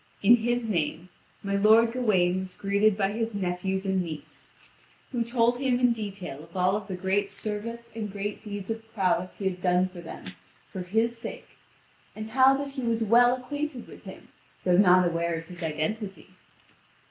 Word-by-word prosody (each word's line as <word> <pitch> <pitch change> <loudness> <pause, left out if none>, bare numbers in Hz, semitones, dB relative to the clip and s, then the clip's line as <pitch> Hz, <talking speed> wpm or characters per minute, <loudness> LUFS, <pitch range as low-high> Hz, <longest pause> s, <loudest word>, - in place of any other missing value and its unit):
In 235 +4 +8
his 240 +1 -1
name, 170 -2 -2 0.3
my 200 0 -1
lord 220 +3 +5
Gawain 190 -7 +2
was 190 -1 -6
greeted 200 +1 +2
by 195 -1 +1
his 225 0 -2
nephews 190 0 -2
and 190 -1 +1
niece, 160 -4 -7 0.6
who 240 -3 0
told 240 +1 +2
him 260 -2 +1
in 245 -1 +4
detail 195 -10 -6
of 170 +3 -11
all 185 +3 +2
the 195 -2 -6
great 195 +2 0
service 225 +3 -5
and 215 -3 -4
great 205 +1 -4
deeds 205 -1 -5
of 225 0 -4
prowess 185 -2 0
he 200 - -5
had 185 -1 -1
done 180 0 +2
for 180 -1 -10
them 165 - -9 0.5
for 190 - -4
his 225 +6 0
sake, - - -8 0.7
and 215 0 -7
how 265 +2 +5
that 280 0 -4
he 275 - -5
was 230 -2 0
well 240 +3 +5
acquainted 290 +1 -5
with - - -14
him, - - -11 0.3
though 180 -1 +3
not 180 -1 +6
aware 170 0 -1
of 165 0 -6
his 175 +1 -11
identity. 180 +6 -3
205 Hz, 180 wpm, -27 LUFS, 185-230 Hz, 0.7 s, In